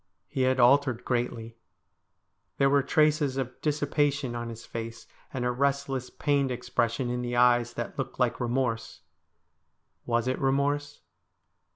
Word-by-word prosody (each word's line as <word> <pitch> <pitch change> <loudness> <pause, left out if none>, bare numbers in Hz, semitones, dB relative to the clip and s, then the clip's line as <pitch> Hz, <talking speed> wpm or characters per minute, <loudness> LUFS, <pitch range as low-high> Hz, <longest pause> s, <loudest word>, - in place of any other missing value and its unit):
He 130 - -3
had 130 0 +2
altered 125 -1 +4
greatly 115 -2 -2 0.5
> - - -50
There 135 0 +3
were 140 0 +5
traces 150 -1 +2
of 130 -2 -4
dissipation 145 -3 0
on 120 0 -4
his 115 0 -9
face, 115 0 -6 0.3
and 125 -2 -3
a 125 - +2
restless, 135 0 -1
pained 140 -3 0
ex 125 0 -6
pression 120 +2 0
in 125 0 -2
the 120 0 -3
eyes 120 0 +4
that 120 +4 -5
looked 135 -1 -4
like 125 -2 +1
remorse. 120 -5 -2 1.1
Was 120 0 +1
it 130 - -1
remorse 145 +2 0
130 Hz, 150 wpm, -28 LUFS, 120-140 Hz, 1.1 s, were